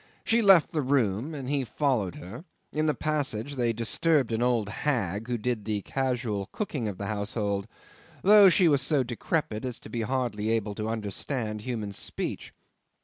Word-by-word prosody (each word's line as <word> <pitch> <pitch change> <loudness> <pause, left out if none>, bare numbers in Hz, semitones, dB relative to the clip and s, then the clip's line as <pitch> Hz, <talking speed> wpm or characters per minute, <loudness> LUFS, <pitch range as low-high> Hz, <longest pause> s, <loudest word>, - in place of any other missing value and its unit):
She 230 +1 +3
left 195 -6 +6
the 155 - 0
room, 130 +1 0
and 135 -3 -6
he 140 0 0
followed 120 - 0
her; 110 - -9 0.3
in 155 +1 +1
the 150 - +2
passage 145 -5 -2
they 120 -3 +1
disturbed 120 +4 +1
an 110 +1 0
old 120 -4 +2
hag 110 - -1
who 120 -1 -1
did 115 -1 -2
the 105 -1 -2
casual 125 -7 -2
cooking 145 - -3
of 100 -3 -4
the 100 - -4
household, 100 -1 -2 0.6
though 205 0 +8
she 180 0 +4
was 140 -3 +4
so 135 0 +2
decrepit 120 -1 -2
as 125 -2 -3
to - - -11
be 115 - -2
hardly 115 -3 -1
able 110 -2 0
to 110 +1 -3
understand 110 +1 -3
human 110 -3 -4
speech. 100 - -5
120 Hz, 175 wpm, -28 LUFS, 105-140 Hz, 0.6 s, though